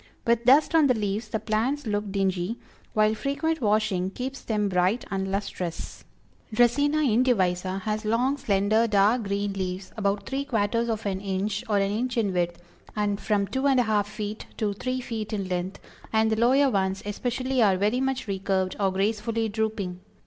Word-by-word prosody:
With 235 0 +2
dust 280 +6 +5
on 320 -3 +5
the 255 - +3
leaves 210 +1 -2
the 220 +1 -2
plants 230 +7 -1
look 205 -2 -2
dingy, 195 +2 -1 0.4
while 215 0 +4
frequent 280 +7 -1
washing 210 -4 +1
keeps 260 +6 -5
them 210 -2 0
bright 185 +5 +1
and 195 -1 -1
lustrous. 185 -4 -4 0.5
Dracæna 285 +7 +3
indivisa 195 -6 +1
has 215 +2 -2
long, 240 +6 +1
slender, 215 0 +2
dark 210 +3 +3
green 200 0 -1
leaves, 185 -1 -4
about 200 -1 -1
three 270 +1 -2
quarters 230 -1 0
of 225 -1 -2
an 190 -1 -2
inch 200 +2 -2
or 205 - +3
an 195 0 +1
inch 240 +3 -2
in 205 -4 +1
width, 175 -1 -1 0.4
and 205 -1 -1
from 205 -2 +1
two 265 +6 -1
and 270 -2 +4
a - - +4
half 210 -2 +1
feet 210 0 -5
to 210 -2 0
three 255 +5 -3
feet 225 -3 -5
in 200 -3 -2
length, 180 +1 -3 0.3
and 220 0 +2
the - - +3
lower 260 +5 +4
ones 190 -2 0
especially 250 +5 -1
are 195 -4 +4
very 210 +6 +1
much 265 -2 -1
recurved 190 -1 -1
or 195 -2 +2
gracefully 220 +3 0
drooping. 210 -4 -2
215 Hz, 180 wpm, -26 LUFS, 195-235 Hz, 0.5 s, dust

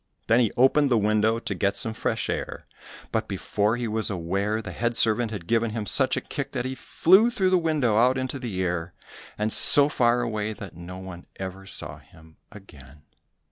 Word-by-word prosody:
Then 115 +2 +3
he 115 -4 +1
opened 135 +3 +3
the 120 - +2
window 110 +1 +1
to 115 - -5
get 100 +2 -1
some 110 +3 -2
fresh - - -3
air, - - -5 0.5
but 110 0 -2
before 105 +3 -2
he 120 -1 -4
was 110 0 -2
aware, 100 +4 -3
the 110 - -8
head 120 0 -3
servant 115 +1 +3
had 105 -6 -8
given 115 +3 0
him 110 -1 -5
such - - +3
a - - -2
kick - - -7
that 125 -1 -3
he 130 - -4
flew 190 - +3
through 190 -6 -1
the 185 - +3
window 150 -10 0
out 125 +3 +3
into 130 +1 -4
the 105 -7 -4
air, 90 -1 -4 0.4
and 105 +1 -1
so 145 0 +9
far 120 -3 +1
away 110 -2 -4
that 100 -4 -11
no 85 +2 -10
one 95 -2 -11
ever 95 0 -8
saw 75 -5 -6
him 80 +2 -21
again. 75 -8 -16
110 Hz, 200 wpm, -24 LUFS, 95-120 Hz, 0.5 s, so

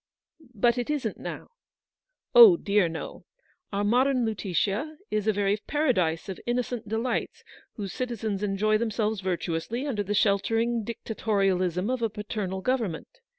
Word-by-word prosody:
"But 235 +4 +2
it 245 - -3
isn't 270 -8 -2
now?" - - -7 0.4
" - - -67 0.3
Oh 460 -8 +10
dear, 200 - +2
no. 160 - -7 0.5
Our 200 0 -1
modern 250 +3 +3
Lutetia 210 - -1
is 215 0 -1
a - - +5
very 205 0 +1
paradise 185 - +1
of 190 - -6
innocent 240 -2 -2
delights, 225 +2 -2 0.3
whose 200 -3 -5
citizens 225 -5 -3
erijoy 210 +1 +1
themselves 220 -2 -1
virtuously 185 - -2
under 245 -8 -1
the 205 +1 -2
sheltering 225 +4 +1
dictatorialism 195 -4 -1
of 255 - -3
a 225 - +1
paternal 205 -3 -4
government. 225 -9 -1
215 Hz, 140 wpm, -27 LUFS, 195-240 Hz, 0.5 s, Oh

